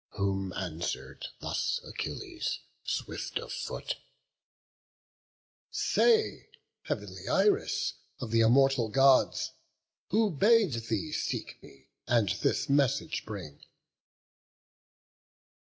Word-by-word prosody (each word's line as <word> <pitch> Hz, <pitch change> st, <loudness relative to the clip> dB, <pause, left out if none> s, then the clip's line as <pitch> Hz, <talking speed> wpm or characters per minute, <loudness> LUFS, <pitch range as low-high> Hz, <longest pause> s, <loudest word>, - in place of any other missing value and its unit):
Whom 95 Hz, -2 st, 0 dB
answer'd 90 Hz, -, -4 dB
thus 485 Hz, -, -1 dB
Achilles, 355 Hz, -8 st, -4 dB, 0.3 s
swift -, -, -3 dB
of -, -, -5 dB
foot: -, -, -4 dB, 1.7 s
"Say, 450 Hz, -2 st, +2 dB, 0.4 s
heav'nly -, -, -4 dB
Iris, 420 Hz, +2 st, +2 dB, 0.3 s
of 125 Hz, -4 st, -5 dB
th' 115 Hz, 0 st, +4 dB
immortal 125 Hz, 0 st, +4 dB
Gods 135 Hz, +2 st, +4 dB, 0.6 s
Who 215 Hz, +1 st, +3 dB
bade 205 Hz, -, +4 dB
thee 115 Hz, +5 st, -2 dB
seek -, -, -3 dB
me, 70 Hz, -1 st, -17 dB, 0.2 s
and 115 Hz, -5 st, +3 dB
this 95 Hz, -, 0 dB
message 140 Hz, +2 st, +1 dB
bring?" 90 Hz, -9 st, -7 dB
135 Hz, 85 wpm, -30 LUFS, -, 1.7 s, th